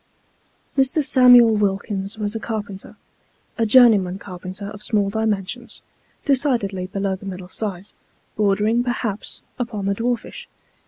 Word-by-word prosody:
ME. 270 - +5
SAMUEL 250 -5 +5
WILKINS 200 0 -2
was 210 -1 -3
a 225 - -3
carpenter, 205 -4 -6 0.6
a 225 - +2
journeyman 210 -6 +5
carpenter 185 +1 -8
of 210 0 -10
small 205 -2 0
dimensions, 220 +2 -3 0.4
decidedly 240 -10 0
below 195 0 -2
the 195 +1 -11
middle 185 -1 -7
size 200 -2 -5 0.4
bordering, 210 +3 +2
perhaps, 235 -4 -4 0.2
upon 225 -5 -3
the 200 - +1
dwarfish. 245 - -3
210 Hz, 120 wpm, -21 LUFS, 195-240 Hz, 0.6 s, ME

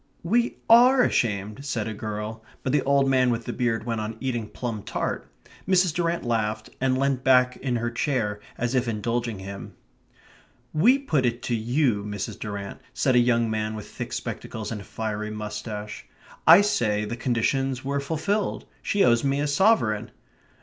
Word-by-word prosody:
"We 235 +8 +1
ARE 250 +3 +7
ashamed," 105 - 0
said 120 -6 -2
a 110 - -3
girl. 110 +1 -5 0.2
But 130 - 0
the 145 - +4
old 140 0 +3
man 130 -1 +3
with 115 -1 -1
the - - -3
beard 120 -3 0
went 115 -1 -2
on 110 +1 -5
eating 120 -5 -3
plum 115 -4 -4
tart. - - -4 0.4
Mrs. 185 -3 +3
Durrant 170 0 -1
laughed 110 -2 -1
and 130 -1 +2
leant 135 -1 0
back 125 -1 +4
in 130 -2 -2
her 120 0 -1
chair, 115 -5 -1 0.2
as 120 +1 -1
if 130 -1 +1
indulging 115 0 -2
him. 95 +1 -8 1.0
"We 225 - +5
put 160 - 0
it 120 0 -1
to 125 -2 0
you, 120 -1 +1
Mrs. 105 -1 -5
Durrant," 100 -2 -6
said 130 - +2
a - - +7
young 120 -2 +2
man 110 0 -2
with 105 - -8
thick - - -6
spectacles 110 -1 -5
and 105 -3 -4
a - - -12
fiery 105 -1 -4
moustache. 105 0 -6 0.4
"I 170 +5 +10
say 105 - +1
the 115 - -4
conditions 130 +2 0
were 140 +1 0
fulfilled. 165 +8 -1 0.2
She 200 - +2
owes 120 -1 +4
me 140 0 +1
a 145 - +1
sovereign." 140 - +2
120 Hz, 175 wpm, -25 LUFS, 110-140 Hz, 1.0 s, I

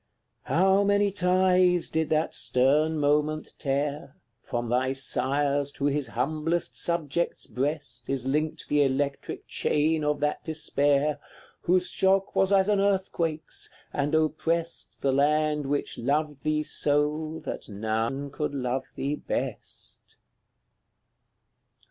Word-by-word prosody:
How 190 +3 +3
many 205 0 +3
ties 180 -1 +3
did 160 -1 0
that 155 0 +1
stern 150 +5 +2
moment 150 +1 +1
tear! 140 +2 -2 0.3
From 120 0 -3
thy 130 +3 +1
Sire's 140 +2 0
to 140 - -3
his 145 -1 0
humblest 155 +7 -1
subject's 170 -1 -1
breast 135 -3 -4
Is 135 -2 -1
linked 150 +3 -1
the 145 0 +3
electric 140 +1 -1
chain 155 +1 +1
of 150 -1 0
that 150 0 0
despair, 150 -2 +1 0.4
Whose 180 +1 +2
shock 195 0 +2
was 195 0 +3
as 195 -1 +4
an 205 -1 +3
earthquake's, 185 -5 -1 0.2
and 145 +2 0
oppressed 160 +2 -1
The 135 -1 +2
land 150 +1 +2
which 145 +1 -2
loved 145 +3 -1
thee 155 0 0
so, 150 +2 0
that - - -5
none 110 +7 -2
could 150 -1 -3
love 130 0 -1
thee 140 +2 -2
best. - - -6
150 Hz, 120 wpm, -27 LUFS, 140-160 Hz, 0.4 s, as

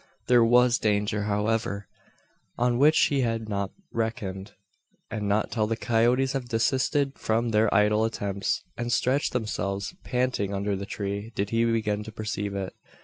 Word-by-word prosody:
There 120 -1 +5
was 125 +1 +4
danger, 105 0 0
however, 105 -1 -1 0.7
on 120 0 +1
which 150 +3 +5
he 140 -2 +3
had 115 -2 -1
not 100 -2 -2 0.2
reckoned; 105 -4 -3 0.6
and 105 -2 -2
not 105 +1 +1
till 110 -3 0
the 115 +1 -1
coyotes 120 +3 +2
have 130 -3 -4
desisted 135 +4 +1
from 115 +2 0
their 110 -1 +3
idle 105 +2 +3
attempts, 100 -3 -2
and 120 0 -3
stretched 130 +4 +1
themselves, 100 -4 -2
panting, 125 -6 -1
under 100 +1 -1
the 100 +1 -5
tree, 100 +2 -4
did 100 +1 -2
he 115 0 +2
begin 110 -3 0
to 110 - -8
perceive 105 -2 -4
it. 95 -1 -4
110 Hz, 155 wpm, -26 LUFS, 100-120 Hz, 0.7 s, There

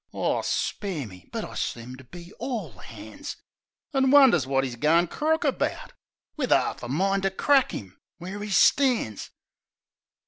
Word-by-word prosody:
(Aw, - - 0
spare 185 -9 -2
me! 90 -4 -13
But - - -4
I - - -10
seemed 125 +2 -5
to - - -12
be 175 - -12
all 185 - -5
'ands!) 110 -1 -9 0.6
An' 265 -1 +3
wonders 260 - +6
wot 135 0 +1
'e's 125 -2 -5
goin' 160 +7 +3
crook 315 - 0
about, - - -2 0.4
Wiv 270 -5 -2
'arf 130 - +2
a 120 - -6
mind 195 +9 0
to 195 - +1
crack 270 +7 +2
'im 95 -2 -8 0.2
where 185 +4 -7
'e 210 - -5
stands. 230 - +2
175 Hz, 160 wpm, -26 LUFS, -, 0.6 s, wonders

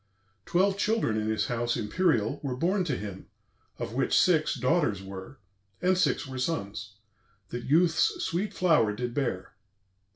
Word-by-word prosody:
Twelve 195 +2 +2
children 215 - +1
in 110 0 -1
his 110 -1 0
house 120 +1 -1
imperial 120 - +1
Were 135 -3 -3
born 180 +7 +1
to 140 -6 -1
him; 100 -2 -7 0.5
of - - -5
which - - +2
six 160 -4 +3
daughters 125 - +1
were, 95 +7 -9 0.4
And 185 +1 +3
six 185 - +1
were 130 -1 -6
sons, 105 -8 -3 0.5
that 120 0 -5
youth's 165 +3 +3
sweet 185 +5 -1
flower 155 - +3
did 120 +2 -3
bear. 120 -9 -2
130 Hz, 150 wpm, -28 LUFS, 110-175 Hz, 0.5 s, six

